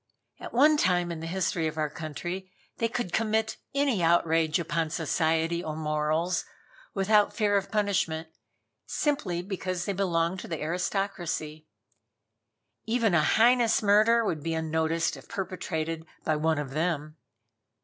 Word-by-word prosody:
At - - -8
one 300 +5 +5
time 175 -6 +2
in 165 - -5
the 165 - -5
history 175 -2 0
of 155 - -5
our 155 -1 +1
country 175 +5 -6 0.3
they 230 - +1
could 225 -5 -4
commit 220 0 0 0.2
any 275 -8 +2
outrage 165 -1 +3
upon 165 -1 -1
society 165 +1 0
or 155 -1 -4
morals 155 +3 0 0.5
without 205 +1 +3
fear 205 -1 +2
of 195 -1 0
punishment, 190 -7 0 0.6
simply 280 - -1
because 185 -2 -3
they 200 - -1
belonged 180 -1 0
to - - -8
the 165 -3 -4
aristocracy. 175 -2 -2 1.2
Even 225 -3 +1
a 165 -3 +4
heinous 235 +2 +4
murder 215 +3 +5
would 160 -7 -1
be 165 +2 -2
unnoticed 160 +1 0
if - - -15
perpetrated 165 -5 -4 0.2
by 155 - +1
one 160 +1 +1
of 145 -2 -4
them. 155 0 -2
175 Hz, 140 wpm, -28 LUFS, 160-205 Hz, 1.2 s, one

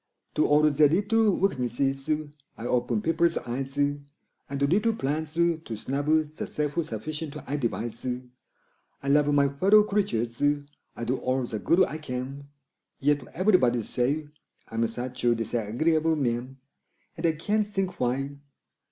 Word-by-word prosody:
To 155 - +2
all 150 +1 +4
their 150 -1 +5
little 205 +4 +3
weaknesses 135 -4 0 0.5
I 115 - -7
open 120 -3 0
people's 165 +1 +2
eyes 135 +3 -4
And 145 0 +1 0.5
little 175 +12 +2
plans 155 -2 -2
to 170 -1 +2 0.2
snub 140 +6 -3
the 155 -1 +1
self 150 +2 -1
sufficient 150 +5 -5
I 145 - -3
devise; 120 -3 -3 1.0
I - - -5
love 145 +1 +4
my 140 -1 +4
fellow 195 +10 +5
creatures 120 - -1 0.5
I - - -5
do 125 +3 0
all 130 +1 0
the 110 -3 -4
good 175 - +4
I 155 - -3
can 135 0 -5 0.5
Yet 145 0 +1
everybody 160 - +3
say 140 +8 -1 0.4
I'm 115 +1 0
such 125 +2 -6
a 120 -1 +4
disagreeable 120 +9 +1
man! 130 -1 -2 0.6
And 165 +1 0
I 165 - +2
can't 210 +7 0
think 195 -3 -3
why! 135 +3 -1
145 Hz, 140 wpm, -27 LUFS, 125-160 Hz, 1.0 s, their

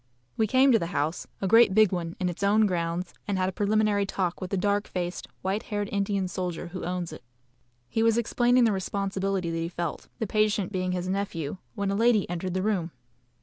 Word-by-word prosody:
We 220 - +2
came 260 +4 +5
to 230 - +5
the 170 - -2
house, 150 +4 -1
a 195 - 0
great 225 -1 +6
big 215 -3 +6
one, 170 -2 -3
in 185 - 0
its 175 +1 -4
own 210 +2 +4
grounds, 175 -1 -2
and 200 -2 0
had 185 0 +1
a - - -1
preliminary 205 0 +1
talk 180 -3 -2
with 185 - -4
the 195 - -1
dark 205 +2 +1
faced, 175 -1 -4 0.2
white 195 +3 0
haired 205 -3 -3
Indian 200 -1 0
soldier 180 -1 -4
who 185 +1 -6
owns 175 -2 -3
it. - - -10 0.7
He 225 - -1
was 225 0 +4
explaining 240 +1 +3
the 225 - +4
responsibility 195 -2 -1
that 165 - -2
he 165 0 -2
felt, 170 -2 -4
the 225 - -2
patient 210 -2 +1
being 185 -2 -1
his 180 0 -2
nephew, 185 -5 -2 0.2
when 200 -2 -1
a - - 0
lady 225 -1 +3
entered 175 +1 -3
the 185 - 0
room. 195 -6 0
195 Hz, 215 wpm, -27 LUFS, 180-210 Hz, 0.7 s, great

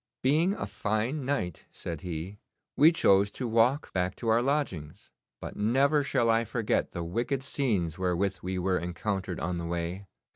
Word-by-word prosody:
'Being 160 +9 +3
a - - -3
fine 120 +7 -2
night,' 125 - -2
said 80 -3 -6
he, 90 +3 -5 0.4
'we 155 +4 +7
chose 100 - +4
to 125 - -3
walk 115 +5 +2
back 90 0 0
to 115 - -3
our 115 +1 +4
lodgings; 120 - -2 0.3
but - - -7
never 135 +8 +3
shall 130 -4 +1
I 115 +1 +3
forget 115 -1 -1
the 85 - -4
wicked 120 +10 -2
scenes 100 - -1
wherewith 95 +2 0
we 95 +1 -3
were 90 0 +1
encountered 90 +1 -3
on 85 0 -2
the 85 - -4
way. 85 +3 -3
105 Hz, 170 wpm, -29 LUFS, 90-130 Hz, 0.4 s, we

